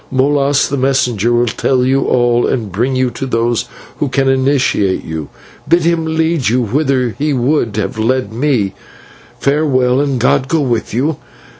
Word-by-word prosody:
Molas, 140 +1 +2
the 140 - -3
messenger, 125 -4 +1
will 120 0 +2
tell 125 +2 0
you 135 +1 +1
all 120 -1 +2
and 110 -6 -2
bring 120 +8 -1
you 130 -1 0
to 135 - -5
those 115 -1 0 0.3
who 145 - -1
can 135 +1 0
initiate 130 -7 +1
you. 80 -2 -5 0.4
Bid 170 0 +3
him 165 -1 +1
lead 160 -6 +1
you 125 +3 +1
whither 130 0 0
he 150 0 0
would 125 -4 0
have 105 +1 -3
led 115 -1 0
me. 120 -6 0 0.7
Farewell, 135 -3 +1
and 140 -3 -1
God 130 +2 +2
go 160 +2 +1
with 120 -5 -1
you. 135 +6 -1
130 Hz, 165 wpm, -15 LUFS, 120-140 Hz, 0.7 s, Bid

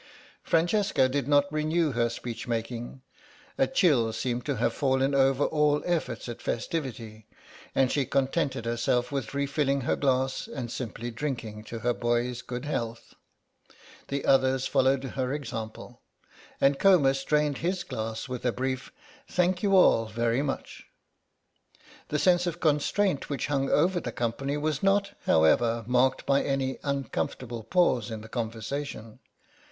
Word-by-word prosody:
Francesca 170 -4 +2
did 135 0 -2
not 145 -1 +4
renew 155 +1 +1
her 120 -1 +1
speech 120 0 -6
making; 120 +2 -4 0.5
a 270 - +2
chill 145 - +3
seemed 120 +2 -2
to 140 - -1
have 120 - 0
fallen 135 0 +1
over 135 0 +3
all 150 -1 +2
efforts 155 -11 -2
at 120 - -7
festivity, 115 -6 -4 0.5
and 130 -1 +3
she 140 - +1
contented 135 -1 0
herself 120 +2 0
with 135 -2 -3
refilling 140 0 0
her 125 - 0
glass 130 -1 0
and 125 -5 -6
simply 120 -1 -5
drinking 115 -5 -4
to 115 - -7
her 120 +2 +1
boy's 120 +1 -1
good 125 +2 -6
health. 115 -6 -4 0.9
The 140 0 -3
others 130 -1 +3
followed 130 +1 +2
her 130 -1 -3
example, 115 -6 -6 0.6
and 135 0 +3
Comus 140 -9 +4
drained 150 -1 +1
his 180 +2 -1
glass 115 -2 -4
with 125 -2 -5
a 125 - +2
brief 130 +2 -3 0.4
"thank 180 0 +1
you 200 -2 +3
all 115 -11 +5
very 115 +3 0
much." 140 -2 -5 1.2
The 150 - -1
sense 180 +2 +3
of 170 - -3
constraint 155 +3 +1
which 140 - -2
hung 135 -2 0
over 175 +4 +3
the - - -5
company 135 +5 -2
was 150 -1 -1
not, 200 +1 +2 0.2
however, 115 +9 +3
marked 125 +2 +2
by 140 0 +3
any 135 -1 -1
uncomfortable 130 -3 -3
pause 125 - +2
in 110 -1 -5
the 110 - -11
conversation. 115 0 -5
135 Hz, 145 wpm, -27 LUFS, 120-145 Hz, 1.2 s, all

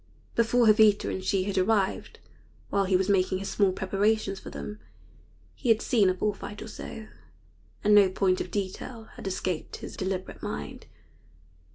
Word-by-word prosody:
Before 235 +1 +3
Jovita 215 -1 +5
and 190 - -4
she 190 0 +1
had 195 -1 -1
arrived, 195 0 0 0.5
while 200 -1 +2
he 190 0 +2
was 185 +1 +2
making 185 -2 +2
his 195 +1 -5
small 200 -3 +3
preparations 195 +1 0
for - - -9
them, 210 0 -7 0.7
he 250 - -4
had 225 -1 +5
seen 210 -7 +3
a 185 - 0
bull 210 +3 0
fight 205 +1 -8
or - - -9
so, 220 0 -8 0.8
and 210 0 +4
no 205 -2 +7
point 185 0 +1
of - - -5
detail 215 +3 -5
had - - -8
escaped 185 -3 -3
his - - -8
deliberate 190 -1 -4
mind. 75 0 -6
195 Hz, 170 wpm, -27 LUFS, 185-215 Hz, 0.8 s, no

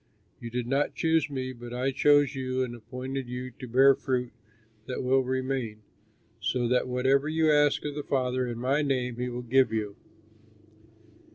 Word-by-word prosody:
You 120 - -7
did 120 0 -3
not 135 +4 0
choose 160 -2 +1
me, 130 -2 -4
but 120 0 -8
I 130 +2 0
chose 145 +1 +4
you 130 -1 -1
and 120 -2 -4
appointed 125 +2 -6
you 125 +1 -5
to 125 +2 -10
bear 135 +3 +6
fruit 125 -2 -2 0.6
that 130 - -3
will 130 +1 +3
remain, 130 -4 -3 0.6
so 120 +4 0
that 125 0 +2
whatever 130 +3 +2
you 160 0 +3
ask 145 -1 +3
of 145 - -3
the 150 - -4
Father 130 -2 -1
in 120 -1 -4
my 135 +5 +1
name 125 -4 -1
he 125 0 -2
will 125 0 -5
give 130 0 +3
you." 105 -2 -2
130 Hz, 175 wpm, -28 LUFS, 125-135 Hz, 0.6 s, bear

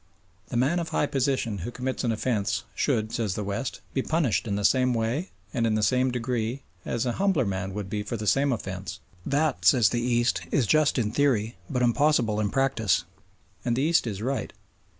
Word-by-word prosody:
The 120 - -2
man 140 +8 +2
of 165 -2 -3
high 155 - +1
position 130 -6 0
who 90 - -4
commits 130 +2 -3
an 120 - +1
offence 110 -2 -1
should, 110 0 0
says 105 -5 -1
the 105 - -2
West, 100 +6 -4
be 135 - +1
punished 155 -6 0
in 100 - -1
the 100 0 -1
same 125 +1 +3
way 115 - -1 0.2
and 115 -4 +1
in 110 - +1
the 110 - +1
same 130 +3 +3
degree 125 +1 -2 0.2
as 120 +1 -1
an 120 - 0
humbler 190 -10 +2
man 95 -1 -3
would 105 -2 -4
be 105 +2 -3
for 105 +3 -4
the 105 - -5
same 135 +7 +3
offence. 95 -5 -4 0.3
That, 145 - +1
says 110 +3 +5
the 120 - -1
East, 120 0 +1
is 135 - +2
just 155 +6 +3
in 110 -4 0
theory 120 -4 +1
but 125 -3 0
impossible 120 -4 +2
in 105 -1 +1
practice. 135 -7 +1 0.6
And 120 - 0
the 130 - 0
East 165 -4 +3
is 105 -1 -4
right. 130 -2 -2
120 Hz, 205 wpm, -26 LUFS, 105-135 Hz, 0.6 s, says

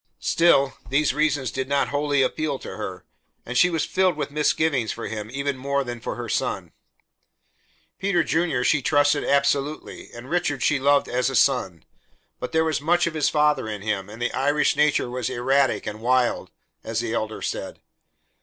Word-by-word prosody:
Still, 140 -5 +3
these 140 0 +2
reasons 145 -4 0
did 130 0 -4
not 140 0 +1
wholly 145 -1 +1
appeal 145 +1 -1
to - - -8
her, - - -6 0.4
and 125 - -6
she 180 +8 +5
was 165 -3 -1
filled 185 -3 +1
with 150 - -3
misgivings 150 -5 +1
for 115 - -6
him 110 -1 -5
even 140 +2 -2
more 140 +2 -1
than 120 -2 -6
for - - -4
her 120 -1 -6
son. - - -2 1.3
Peter 190 -3 +1
Junior 160 -5 0
she 145 +3 +2
trusted 145 +1 +2
absolutely 140 +1 -1
and 120 +2 -10
Richard 160 -5 -1
she 145 -2 +2
loved 140 +1 +3
as 125 +2 0
a 135 - -4
son; 115 - +1 0.5
but 125 - -5
there 160 0 +2
was 155 -2 -1
much 175 +3 +2
of 170 - -2
his 155 -2 +1
father 150 -6 +1
in 105 -2 -6
him, 105 -2 -2
and 110 +2 -10
the 120 - -1
Irish 145 +3 +2
nature 150 -3 +2
was 125 0 -3
erratic 130 +2 +1
and 105 +1 -6
wild, 125 +1 +1 0.3
as 115 0 -2
the 115 -1 -3
Elder 110 -1 -3
said. - - -4
140 Hz, 180 wpm, -24 LUFS, 125-150 Hz, 1.3 s, she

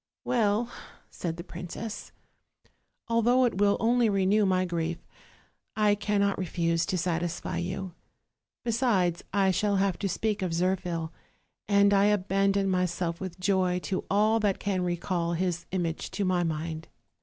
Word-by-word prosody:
"Well," 230 0 +1 0.4
said 165 -2 -4
the 170 - -6
princess, 180 +5 -7 1.0
"although 235 +2 +3
it 225 -5 -1
will 205 0 +4
only 235 0 +3
re 195 -2 +1
new 205 +1 +3
my 185 0 +2
grief, 170 -1 -2 0.8
I 210 -1 +3
cannot 205 -1 0
refuse 170 -2 0
to 190 -2 0
satisfy 170 -1 -2
you; 185 +1 -4 0.7
besides, 220 -8 +1
I 195 -1 +3
shall 200 +2 +1
have 195 -2 +1
to 200 - -1
speak 210 +3 -1
of 180 -3 -1
Zirphil, 175 -2 -1 0.6
and 200 0 +4
I 200 0 +5
abandon 195 -1 +2
myself 180 -2 -1
with 185 -1 -6
joy 185 -1 +1
to 190 - -2
all 215 +3 +3
that 205 -3 +1
can 195 -2 -1
recall 175 -1 -1
his 175 0 -2
image 170 -3 -2
to 200 - 0
my 185 -1 +2
mind." 160 0 -3
190 Hz, 145 wpm, -28 LUFS, 175-205 Hz, 1.0 s, I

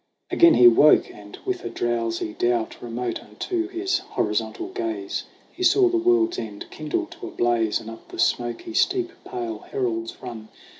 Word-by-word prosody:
Again 340 -1 +6
he 120 - +8
woke, 145 +6 +6
and 105 0 -12
with 370 -2 -2
a - - -3
drowsy 115 -2 -2
doubt, 120 -1 -1
Remote 120 +1 -3
unto 350 -2 -3
his 380 +2 -1
horizontal 350 -1 -2
gaze 365 -1 -3 0.3
He - - -12
saw 370 0 +5
the 355 - +1
world's 350 0 +2
end 105 -2 -6
kindle 155 -1 -2
to - - -9
a - - -6
blaze 115 -2 +1
And 115 - -11
up 115 0 -10
the - - -10
smoky 120 -2 0
steep 365 - +1
pale 115 -3 -4
heralds 115 -3 -3
run. 115 -4 -8
125 Hz, 165 wpm, -24 LUFS, -, 0.3 s, he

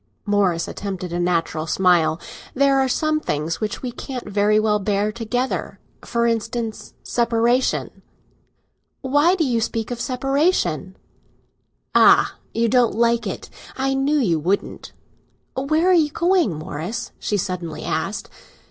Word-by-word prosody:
Morris 200 -5 +1
attempted 185 -3 -5
a 175 - -1
natural 165 -2 0
smile. 170 -3 +3 0.4
"There 275 0 +4
are 265 - +2
some 310 +4 +1
things 155 - -3
which 215 +3 -3
we 250 - -3
can't 250 0 -7
very 205 +1 +2
well 215 -1 +2
bear 205 +1 0
together—for 235 0 -3
instance, 230 -1 -2
separation." 235 +1 0 1.0
"Why 290 +6 +3
do 350 - +1
you 235 -3 +1
speak 225 +1 -2
of 240 -1 -4
separation?" 255 - 0 1.0
"Ah! - - +6 0.2
you 230 0 +1
don't 245 0 +3
like 235 +1 +2
it; - - -6 0.3
I 270 +1 0
knew 275 +3 +1
you 180 - +2
wouldn't!" 185 +6 -2 0.6
"Where 310 +7 +2
are - - +6
you 320 -4 +4
going, 345 - +2
Morris?" 155 +7 -5
she 210 - -1
suddenly 180 -3 -4
asked. - - -2
230 Hz, 130 wpm, -21 LUFS, 190-265 Hz, 1.0 s, Ah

